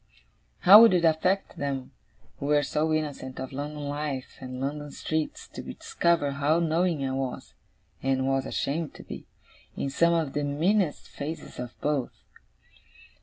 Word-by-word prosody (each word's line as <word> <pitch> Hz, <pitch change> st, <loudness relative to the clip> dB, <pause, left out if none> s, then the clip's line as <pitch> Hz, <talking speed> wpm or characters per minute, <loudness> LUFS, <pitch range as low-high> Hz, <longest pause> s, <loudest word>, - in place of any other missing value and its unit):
How 205 Hz, +4 st, +10 dB
would 230 Hz, -5 st, +7 dB
it 170 Hz, -1 st, +3 dB
affect 180 Hz, +5 st, +1 dB
them, 135 Hz, -2 st, -3 dB, 0.5 s
who 140 Hz, -, -3 dB
were 145 Hz, 0 st, +4 dB
so 155 Hz, +3 st, 0 dB
innocent 145 Hz, -4 st, -3 dB
of 130 Hz, -, -6 dB
London 145 Hz, +1 st, -5 dB
life, 145 Hz, -2 st, -4 dB
and 130 Hz, -1 st, -7 dB
London 145 Hz, +2 st, -3 dB
streets, 155 Hz, +2 st, -3 dB
to -, -, -7 dB
discover 170 Hz, -4 st, 0 dB
how 145 Hz, +3 st, +2 dB
knowing 165 Hz, -2 st, +1 dB
I -, -, -2 dB
was 130 Hz, -1 st, -4 dB, 0.5 s
(and 130 Hz, 0 st, +1 dB
was 135 Hz, 0 st, 0 dB
ashamed 155 Hz, +2 st, -2 dB
to -, -, -10 dB
be) -, -, -9 dB, 0.5 s
in 140 Hz, -, -2 dB
some 170 Hz, +4 st, +3 dB
of 160 Hz, -5 st, -1 dB
the 145 Hz, -, -1 dB
meanest 160 Hz, +4 st, +1 dB
phases 150 Hz, -1 st, -7 dB
of 125 Hz, -1 st, -7 dB
both? 145 Hz, -4 st, -2 dB
145 Hz, 155 wpm, -27 LUFS, 135-160 Hz, 0.5 s, How